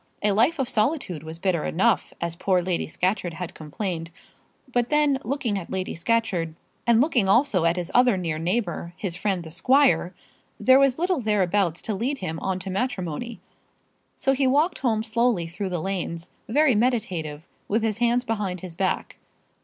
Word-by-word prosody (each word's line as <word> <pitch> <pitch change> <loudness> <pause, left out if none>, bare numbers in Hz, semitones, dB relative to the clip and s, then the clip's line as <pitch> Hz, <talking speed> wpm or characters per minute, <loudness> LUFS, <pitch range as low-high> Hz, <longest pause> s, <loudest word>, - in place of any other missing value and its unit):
A 210 - +3
life 240 +11 +3
of 270 -3 -1
solitude 215 - 0
was 160 +1 -8
bitter 175 -3 0
enough, 195 +5 +1
as 170 -1 -3
poor 185 +1 +2
Lady 175 -1 -1
Scatcherd 180 0 -1
had 180 0 -6
complained. 165 +2 -4 0.6
But 245 -1 +1
then, 295 -2 +3
looking 235 -5 -1
at 175 - -9
Lady 190 -1 -3
Scatcherd, 180 -4 0 0.3
and 235 -1 +5
looking 245 -8 +2
also 215 - +3
at 170 0 +3
his 175 -2 -3
other 245 -4 +5
near 165 -4 -2
neighbour, 175 -1 -2
his 185 -4 -3
friend 190 -2 -1
the 160 - -10
squire, 250 - +3 0.4
there 260 +5 +6
was 275 -2 +3
little 355 -3 0
thereabouts 195 -5 +1
to 220 - -2
lead 245 +8 -1
him 160 -7 -4
on 190 -1 -1
to 190 +1 -5
matrimony. 200 - -3 0.7
So 270 - +1
he 270 0 +2
walked 300 +6 +2
home 220 -4 +1
slowly 230 -5 +1
through 180 +4 -4
the 180 - -2
lanes, 175 -2 -3 0.2
very 290 +3 +4
meditative, 185 -10 -1 0.2
with 220 +2 0
his 220 -1 -1
hands 240 +1 +2
behind 205 -6 -3
his 185 -3 -7
back. 185 +2 -2
200 Hz, 175 wpm, -25 LUFS, 175-245 Hz, 0.7 s, there